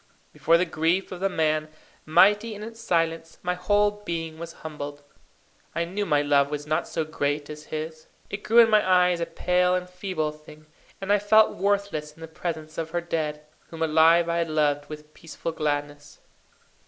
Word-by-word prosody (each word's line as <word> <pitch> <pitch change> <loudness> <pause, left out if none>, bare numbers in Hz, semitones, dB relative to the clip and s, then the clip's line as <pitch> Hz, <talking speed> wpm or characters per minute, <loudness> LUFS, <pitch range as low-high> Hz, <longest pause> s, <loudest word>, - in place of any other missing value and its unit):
Before 165 - +3
the 180 - +1
grief 165 +3 0
of 180 - -6
the 195 +1 +1
man, 155 -3 0 0.4
mighty 210 +7 +4
in 205 - -8
its 225 +1 -9
silence, 165 -5 -1
my 180 0 0
whole 205 +3 +1
being 165 -3 -4
was 170 0 -7
humbled. 145 -2 -7 0.7
I 170 - 0
knew 200 +4 -3
my 145 -2 +2
love 140 -1 +3
was 145 0 -4
not 155 +1 -1
so 160 - -2
great 145 -1 -2
as 150 0 -10
his. 155 0 -6 0.2
It 200 - -6
grew 225 +3 +1
in 230 -1 +8
my 215 -1 +6
eyes 180 -1 +3
a 170 - -2
pale 180 +2 +1
and 180 0 -3
feeble 180 -4 -3
thing; 150 0 -15 0.3
and 195 +1 0
I 205 - +4
felt 215 +2 +4
worthless 195 -6 -1
in 160 - -19
the 165 - -7
presence 160 -1 -5
of 165 -1 -3
her 175 +1 -2
dead, 155 -3 -3 0.2
whom 165 -1 -4
alive 160 +2 +5
I 170 0 0
had 165 -1 -1
loved 145 -2 0
with 150 0 -10
peaceful 165 0 -6
gladness. 145 -2 -3
165 Hz, 190 wpm, -25 LUFS, 155-180 Hz, 0.7 s, in